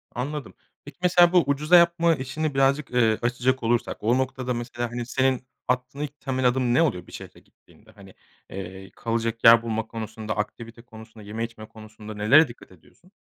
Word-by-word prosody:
Anladım, 145 +3 -5 0.3
peki, 145 - -12
mesela, 175 -1 +5
bu 180 -2 +5
ucuza 150 +5 +3
yapma 170 -1 +4
işini 145 +3 -3
birazcık, 135 +1 +1
eee, 115 -3 +2
açacak 120 +2 0
olursak 115 0 0
o 120 +4 +2
noktada 130 -1 -2
mesela, 120 0 -4
hani, 120 0 -4
senin 130 0 0 0.2
aklına 125 +3 -2
ilk 145 0 -8
temel 130 -2 0
adım 125 -1 +1
ne 145 - +4
oluyor 90 - -1
bir - - -15
şehre - - -11
gittiğinde? - - -24
Hani, 100 -3 -16 0.4
eee, 95 0 -8
kalacak 115 0 -3
yer 115 0 +8
bulma 115 -1 -3
konusunda, 110 -1 -6
aktivite 115 +2 -6
konusunda, 110 -2 -14
yeme 110 +2 -4
içme 115 -2 -8
konusunda 110 0 -11
nelere 120 +10 +5
dikkat 120 -5 -14
ediyorsun? 95 - -22
120 Hz, 175 wpm, -24 LUFS, 110-135 Hz, 0.4 s, yer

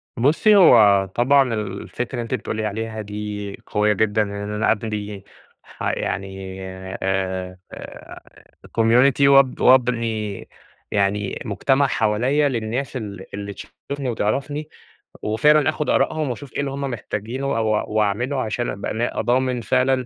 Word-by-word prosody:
بُصّي، 150 - +4
هو 105 - +7
طبعًا 130 0 +4
الفكرة 105 +3 -4
اللي 120 - -2
أنتِ 115 - -5
بتقولي 110 0 -3
عليها 110 +1 -4
دي 105 -1 -6
قوية 105 0 +2
جدًا 110 +1 +1
إن 100 -1 -2 0.2
أنا 105 +1 +2
أبنى 105 -2 -3 0.4
ح - - -17
يعني 95 0 -2 0.7
آآ 95 -1 -2 1.2
community 125 +5 +4
وأب 135 -2 +5
وأبني 115 -5 +2 0.4
يعني 100 0 0
مجتمع 135 +6 +2
حواليّا 125 +7 +1
للناس 125 +2 -3
ال 100 -5 -7
اللي 100 0 -5
تشوفني 140 +7 -7
وتعرفني 140 +7 -2 0.5
وفعلًا 150 +8 +3
آخُد 155 -1 -2
آرائهم 155 -2 +1
وأشوف 125 +1 -7
إيه - - -3
اللي 140 -1 -1
هم 140 +1 -5
محتاجينه 120 0 -4
و 115 - 0 0.3
وأعمله 110 +6 0
عشان 120 +2 -2
أبقى 100 - -4
نا 120 +2 -1
ضامن 125 0 +1
فعلًا 130 +1 +1
115 Hz, 130 wpm, -22 LUFS, 105-130 Hz, 1.2 s, هو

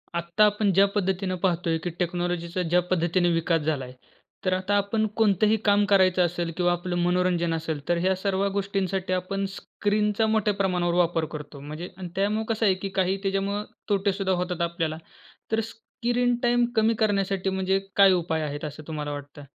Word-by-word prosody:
आत्ता 170 +5 +2
आपण 210 -1 +2
ज्या 195 +2 +6
पद्धतीने 190 -1 0
पाहतोय 170 -3 +1
की 175 - -1
टेक्नॉलॉजीचा 175 0 -2
ज्या 175 +1 +2
पद्धतीने 175 0 +2
विकास 165 0 +1
झालाय, 140 -5 -2 0.5
तर 185 - +2
आता 190 +2 0
आपण 210 +2 +1
कोणतंही 215 0 +3
काम 205 0 +4
करायचं 185 -3 +4
असेल 175 0 -2
किंवा 175 -1 +2
आपलं 175 +1 -2
मनोरंजन 175 -1 +1
असेल, 160 -2 -3
तर 175 - +3
ह्या 185 +2 +1
सर्व 195 +1 0
गोष्टींसाठी 195 -2 -1
आपण 195 +2 -2
स्क्रीनचा 210 +1 0
मोठ्या 215 -1 +2
प्रमाणावर 180 -3 0
वापर 170 -2 +2
करतो. 150 -1 -8
म्हणजे 155 +5 -7
आणि 185 -2 -6
त्यामुळे 210 +3 0
कसं 220 0 0
आहे 190 -2 +4
की 195 - -2
काही 190 0 +1
त्याच्यामुळं 195 +1 -1 0.3
तोटे 200 -1 +2
सुद्धा 190 -1 0
होतात 180 -1 -2
आपल्याला. 165 -2 -1 0.5
तर 220 - +2
स्क्रीन 240 +2 -1
टाईम 240 0 +3
कमी 220 +1 +3
करण्यासाठी 195 -3 +1
म्हणजे 190 0 +1 0.2
काय 195 -1 +7
उपाय 165 -3 0
आहेत 145 0 -4
असं 150 +1 -7
तुम्हाला 150 -2 -4
वाटतं? 145 0 -8
185 Hz, 170 wpm, -25 LUFS, 170-200 Hz, 0.5 s, काय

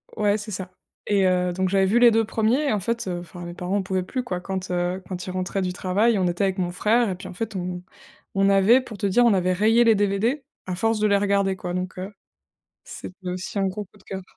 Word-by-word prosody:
Ouais 210 0 +2
c'est 210 0 -7
ça 185 -1 -5 0.4
et 200 -2 +3
heu, 180 -1 +2
donc 185 0 0
j'avais 195 0 +3
vu 220 +5 +3
les 240 -1 +7
2 225 0 +2
premiers 225 +7 +1
et 265 - +2
en 205 - -1
fait, 230 +2 -2
enfin 175 0 -6
mes 175 - -6
parents 180 +3 -2
en - - +1
pouvaient 190 -1 -1
plus, 255 +6 -4
quoi. 180 -6 -3
Quand, 190 0 -4
heu, 180 +1 -1
quand 180 -1 -5
ils 185 - -5
rentraient 185 +1 -2
du 180 -1 -1
travail, 205 +5 +1
on 185 - +2
était 175 +2 -1
avec 190 0 0
mon 180 -2 0
frère 225 +5 +2
et 185 - -2
puis 185 +1 -9
en 185 - -8
fait, 220 +2 -5
on 180 -1 -4 0.5
on 195 0 +3
avait 200 +6 +5
pour 230 -5 -10
te 200 - -2
dire, 200 +5 +4
on 230 - +5
avait 185 -1 +2
rayé 225 +5 +4
les 225 - +6
DVD, 205 +7 0 0.2
à 185 - -3
force 225 +4 0
de 215 - +3
les 200 - +3
regarder 200 -1 +1
quoi, 180 -1 -5
donc, 180 0 -4
heu 185 +2 -5 0.7
c'était 185 0 -9
aussi 185 +3 -4
un 195 - +2
gros 205 +3 -5
coup 185 - -25
de - - -22
cœur 190 0 -6
195 Hz, 265 wpm, -24 LUFS, 185-215 Hz, 0.7 s, les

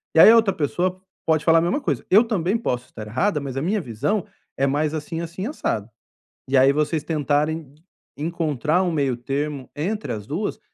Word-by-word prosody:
E - - +6
aí 165 - +10
a - - +7
outra 220 -4 +4
pessoa 180 +5 -1 0.2
pode 155 -2 +2
falar 165 0 +6
a - - +1
mesma 175 - 0
coisa: - - -2
"Eu 205 +5 +7
também 205 -3 0
posso 125 - -2
estar 110 -1 -9
errada, 150 - 0
mas 135 -2 -5
a - - 0
minha 200 +6 0
visão 150 - -1 0.3
é 135 - +2
mais 150 +2 0
assim, 160 +2 -4
assim, 170 +3 -5
assado". 115 - -2 0.6
E 135 - +3
aí 135 +1 +6
vocês 150 +1 0
tentarem 155 +1 0
d 150 - -26 0.4
encontrar 160 +1 0
um 180 - 0
meio 140 -6 0
termo 140 +2 -3
entre 195 - -2
as 105 -2 -7
duas, 195 +9 -3
155 Hz, 200 wpm, -23 LUFS, 140-180 Hz, 0.6 s, aí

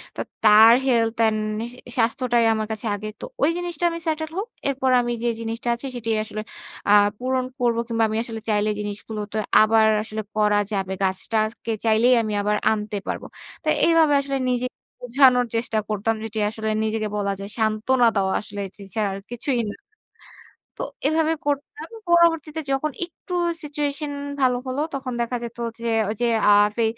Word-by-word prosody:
তো - - -3 0.2
তার 220 +2 +8
health 230 -2 +2
and 220 -1 +3 0.3
সা 250 - -13 0.2
স্বাস্থ্যটাই 240 0 +2
আমার 215 -1 -2
কাছে 220 +1 -5
আগে। 210 +1 -6
তো - - -4 0.2
ওই - - +5
জিনিসটা 350 -2 -4
আমি 335 - -5
সেটেল 315 0 -1
হোক। 410 - -2 0.2
এরপর 265 -1 0
আমি 240 - -2
যে - - +1
জিনিসটা 230 +1 -5
আছে 255 +3 -6
সেটাই 225 -2 -1
আসলে 215 0 -5 0.5
আ 205 - +7 0.3
পূরণ 255 0 0
করব 235 -1 +2
কিংবা 225 -1 +1
আমি 220 - -2
আসলে 225 -2 -6
চাইলে 210 0 +2
জিনিসগুলো 210 +1 -5
তো 220 - -1 0.2
আবার 220 0 +5 0.2
আসলে 220 0 -5
করা 210 -1 +3 0.2
যাবে। 190 -1 -2
গাছটাকে 215 +4 -1
চাইলেই 225 +3 +4
আমি 215 -1 -3
আবার 210 +1 +1 0.2
আনতে 210 -1 -2
পারবো। - - -4 0.4
তো - - -8 0.2
এইভাবে 325 -3 +4
আসলে 275 0 -2
নিজেকে 250 0 -1 0.3
বোঝানোর 250 0 +4
চেষ্টা 230 -1 -1
করতাম। 215 +2 0
যেটি 220 0 -4
আসলে 220 0 -4
নিজেকে 220 0 -1
বলা 200 -1 0
যায় 200 +1 -6
সান্ত্বনা 225 +3 +2
দেওয়া 190 -1 +1
আসলে 205 -1 -8
এ - - -15 0.3
ছাড়া 210 -2 +1
আর - - -6
কিছুই 245 +1 -1
না - - -6 1.0
তো - - -3 0.2
এভাবে 320 +1 +2
করতাম। 290 +9 -3 0.2
পরবর্তীতে 330 -2 +3
যখন 285 +3 0
একটু 355 +1 -11 0.3
সিচুয়েশন 290 0 -3 0.3
ভালো 250 -1 +3
হলো 255 +3 -2
তখন 260 -2 -4
দেখা 240 +1 -1
যেত 235 0 -7 0.2
যে, 235 - -4 0.2
ঐযে 235 +3 -1 0.2
আ - - +8 0.2
ফে 230 - +1
230 Hz, 170 wpm, -23 LUFS, 215-270 Hz, 1.0 s, তার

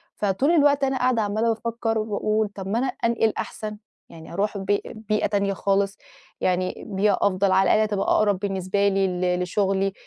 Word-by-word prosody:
فطول 210 - +1
الوقت 290 -4 +4
أنا 265 -1 +1
قاعدة 250 -3 +2
عمّالة 215 +3 0
بافكّر 225 0 -2
وباقول 215 0 0
طب 195 -1 -8
ما 220 +4 0
أنا 265 - 0 0.2
أنقِل 230 -2 +2
أحسن، 215 -1 -5 0.3
يعني 160 0 -12
أروح 205 +3 -1
ب 195 - -6 0.3
بيئة 215 -1 -1
تانية 200 -1 0
خالص، 195 0 0 0.4
يعني 185 0 -1
بيئة 200 +2 +1
أفضل، 195 0 +2
على 190 +1 +4
الآقل - - +4
هتبقى 205 -2 -1
أقرب 205 -3 +2
بالنسبة 195 0 0
لي 195 -1 +2
ل 180 -1 -1
لشُغلي، 195 +1 0
205 Hz, 175 wpm, -24 LUFS, 195-220 Hz, 0.4 s, الوقت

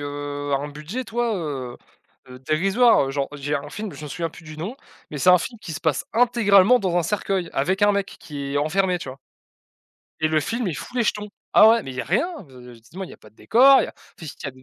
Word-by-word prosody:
heu, 145 0 -5
un 140 +1 0
budget, 155 - -6
tu 225 - -14
vois, 235 -2 0
heu 135 -8 -5 0.5
heu, 125 0 -11
dérisoire. 185 - +3
Genre, 140 -1 -2
j'ai 145 +1 -3
un 145 0 -4
film, 210 +4 -6
je - - -11
me - - -7
souviens 165 +3 -3
plus 165 - -14
du 155 0 -10
nom, 190 - -5 0.3
mais 150 - -5
c'est 180 - +5
un 180 - +7
film 230 +7 -6
qui 170 - -7
se 155 - -6
passe 160 -5 0
intégralement 230 -1 +4
dans 185 -3 -1
un 175 - +3
cercueil 190 -1 -1
avec 185 +9 0
un 205 0 +5
mec, 200 0 -3
qui 140 -2 -6
est - - +2
enfermé, 180 +5 +1
tu 170 - -8
vois? 130 +1 -9 1.0
Et 155 - +2
le 155 0 +2
film, 230 +8 -3
il 170 - -3
fout 250 - -8
les 240 - +3
jetons. 210 -1 -2 0.2
Ah 215 - +8
ouais! 230 0 +4
Mais - - -7
il - - -11
y - - -1
a - - -5
rien, 330 - -1
de 130 -7 -16
de, 125 0 -12
justement, 120 +12 -9
il - - -11
y - - -11
a - - -12
pas 110 - -18
de - - -35
décor, 265 - +5
il - - 0
y - - -5
a - - -10
enfin 165 - -14
si, 145 - -9
tu - - -7
as - - -3
du 130 0 -19
170 Hz, 280 wpm, -23 LUFS, 145-210 Hz, 1.0 s, Ah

